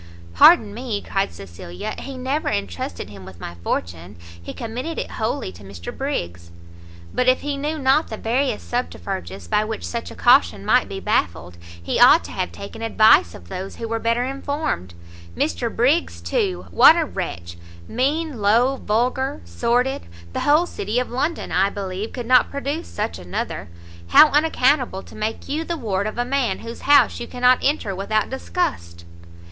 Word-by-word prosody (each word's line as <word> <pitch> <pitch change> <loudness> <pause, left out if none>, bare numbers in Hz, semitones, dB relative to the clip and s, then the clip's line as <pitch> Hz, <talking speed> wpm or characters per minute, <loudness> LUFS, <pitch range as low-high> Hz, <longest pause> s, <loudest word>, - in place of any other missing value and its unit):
"Pardon 215 - +6
me," 230 -2 -3
cried 195 - -2
Cecilia, 85 0 -8
"he 275 -1 -7
never 265 +4 -1
entrusted 90 -1 -4
him 100 -2 -11
with 95 -2 -12
my 85 - -7
fortune, 85 +3 -4 0.3
he 85 - -7
committed 250 +8 -5
it - - -4
wholly 220 - -2
to 90 +2 -14
Mr 95 -3 -8
Briggs." 85 0 -4 0.6
"But 250 - 0
if 255 0 +4
he 290 0 -2
knew 295 +3 -3
not 275 +2 +2
the 220 - -6
various 245 - -1
subterfuges 85 +2 -4
by 210 - +2
which 220 0 -5
such 235 -1 -4
a - - -10
caution 255 +4 +4
might 250 - +3
be 195 - -5
baffled, 85 - -1 0.2
he 85 - -2
ought - - +7
to - - -9
have - - -3
taken 200 - -9
advice 215 - +4
of 85 - -13
those 185 - -6
who 230 - -5
were 225 0 -2
better 230 +2 +1
informed. 275 - -3 0.4
Mr 85 - -1
Briggs, 275 +8 +1
too! 405 -6 -1
what 320 - +8
a 330 - +1
wretch! 85 - -5 0.3
mean, 285 0 -1
low, 235 +6 +3
vulgar, 255 +6 -1
sordid! 245 - 0 0.3
the - - -2
whole 300 +4 +4
city 215 - -2
of 250 - -3
London, 295 +7 -2
I 195 +2 +3
believe, 195 +1 -5
could 245 -2 -6
not 250 +1 +5
produce 285 +4 -4
such 85 +1 -4
another! 90 -1 -5 0.4
how 305 - +8
unaccountable 280 -8 +2
to - - -15
make 215 +1 -4
you 305 +3 -2
the 340 0 -3
ward 205 -6 -1
of 215 - -6
a 245 - 0
man 270 -1 0
whose 230 0 -8
house 290 - +5
you 240 - -5
cannot 250 0 +3
enter 270 -8 0
without 215 +4 -1
disgust!" 85 - -3
230 Hz, 175 wpm, -22 LUFS, -, 0.6 s, what